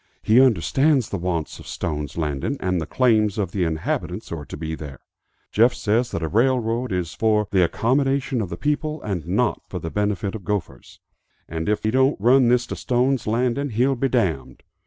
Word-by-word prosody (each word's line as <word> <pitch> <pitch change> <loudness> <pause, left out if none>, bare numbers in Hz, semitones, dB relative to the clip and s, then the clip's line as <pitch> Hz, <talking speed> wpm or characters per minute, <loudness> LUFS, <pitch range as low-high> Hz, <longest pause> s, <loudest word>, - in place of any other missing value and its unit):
He 115 +4 +5
understands 135 - +3
the 100 - -3
wants 85 -3 -3
of - - -12
Stone's 75 -2 -4
Landing, 75 - -2
and 90 -2 -1
the 80 - -5
claims 110 -5 +2
of 95 -4 -1
the 95 -3 0
inhabitants 80 +5 -3
who 85 - -4
are 75 - -9
to - - -7
be 80 +1 -4
there. 75 -3 -7 0.5
Jeff 120 +4 +4
says 115 +4 +1
that 85 - -4
a - - 0
railroad 120 +2 +1
is 90 -2 -2
for 105 +2 +1
the 95 -2 +4
accommodation 135 - +1
of 100 - -4
the - - -5
people 150 +1 -1
and 90 -6 -3
not 90 - 0
for - - -5
the 80 - -5
benefit 105 -2 -1
of 110 -4 -7
gophers; 85 -10 -5 0.5
and 80 +3 -3
if, 105 - 0
he 110 - +1
don't 130 +1 +2
run 125 +4 +5
this 125 0 +3
to - - -5
Stone's 125 0 0
Landing 125 +5 0
he'll 125 +4 +2
be 135 +2 0
damned! 90 - -1
105 Hz, 200 wpm, -23 LUFS, 85-125 Hz, 0.5 s, He